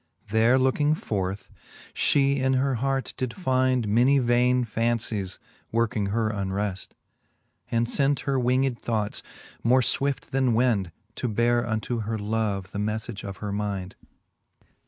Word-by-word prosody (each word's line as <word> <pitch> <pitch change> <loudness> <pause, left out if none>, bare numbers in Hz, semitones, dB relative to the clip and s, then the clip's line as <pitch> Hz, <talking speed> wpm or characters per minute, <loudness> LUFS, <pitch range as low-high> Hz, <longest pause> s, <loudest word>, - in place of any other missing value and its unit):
There 110 +4 +4
looking 145 +4 +2
forth, 100 - -3 0.5
fhe 140 -1 +2
in 130 0 +1
her 135 +1 +1
heart 135 -1 -1
did 130 -2 -3
find 130 - +1
Many 120 +7 +4
vaine 125 0 +3
fancies, 110 -4 -1 0.3
working 110 -3 0
her 110 +2 0
unreft; 100 -1 -3 0.8
And 115 0 +1
lent 140 0 +2
her 135 -2 0
winged 125 0 +1
thoughts, 110 -3 -2 0.4
more 125 +3 +4
fwift 140 +3 -1
then 130 -3 +2
wind, 110 -7 +2 0.3
To 125 - -1
beare 120 +2 +2
unto 115 +1 -2
her 110 +1 -2
love 105 -2 -2
the 100 - -4
melTage 110 +1 -3
of 100 -1 -6
her 100 - -2
mind. 100 -2 -3
115 Hz, 135 wpm, -26 LUFS, 105-130 Hz, 0.8 s, There